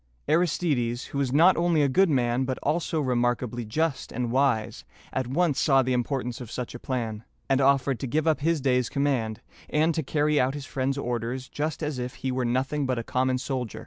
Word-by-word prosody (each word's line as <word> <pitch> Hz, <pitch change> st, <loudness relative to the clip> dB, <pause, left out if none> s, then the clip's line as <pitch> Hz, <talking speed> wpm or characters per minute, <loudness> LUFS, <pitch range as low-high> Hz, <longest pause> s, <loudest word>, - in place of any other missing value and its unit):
Aristides, 150 Hz, -7 st, +1 dB
who 140 Hz, -, -1 dB
was 135 Hz, -3 st, 0 dB
not 165 Hz, +7 st, +6 dB
only 170 Hz, -3 st, +3 dB
a -, -, +4 dB
good 190 Hz, +8 st, +3 dB
man, 125 Hz, -2 st, +1 dB
but 130 Hz, 0 st, -2 dB
also 160 Hz, +1 st, 0 dB
remarkably 120 Hz, -2 st, 0 dB
just 155 Hz, +6 st, -1 dB
and 120 Hz, 0 st, -2 dB
wise, 130 Hz, -4 st, +1 dB, 0.3 s
at 130 Hz, -2 st, -1 dB
once 155 Hz, +2 st, +1 dB
saw 135 Hz, -2 st, +4 dB
the 130 Hz, 0 st, 0 dB
importance 125 Hz, -1 st, -2 dB
of 120 Hz, -, -8 dB
such 125 Hz, 0 st, -5 dB
a 120 Hz, -, -7 dB
plan, 115 Hz, -5 st, -3 dB, 0.2 s
and 135 Hz, 0 st, +2 dB
offered 135 Hz, -1 st, +3 dB
to 135 Hz, -, -3 dB
give 155 Hz, +5 st, 0 dB
up 160 Hz, -2 st, +2 dB
his 160 Hz, +1 st, +1 dB
day's 125 Hz, -2 st, +1 dB
command, 130 Hz, -6 st, -1 dB, 0.3 s
and 155 Hz, +2 st, +2 dB
to 160 Hz, -, -1 dB
carry 150 Hz, +1 st, +1 dB
out 130 Hz, +2 st, +1 dB
his 145 Hz, -2 st, -6 dB
friend's 135 Hz, +1 st, -2 dB
orders 125 Hz, 0 st, -3 dB
just 155 Hz, +2 st, -3 dB
as 150 Hz, -3 st, -2 dB
if 125 Hz, 0 st, -4 dB
he 130 Hz, -, -3 dB
were 130 Hz, -1 st, -1 dB
nothing 135 Hz, +4 st, 0 dB
but 130 Hz, -1 st, 0 dB
a 115 Hz, -, -2 dB
common 130 Hz, +2 st, 0 dB
soldier. 130 Hz, -3 st, -4 dB
130 Hz, 210 wpm, -26 LUFS, 125-150 Hz, 0.3 s, not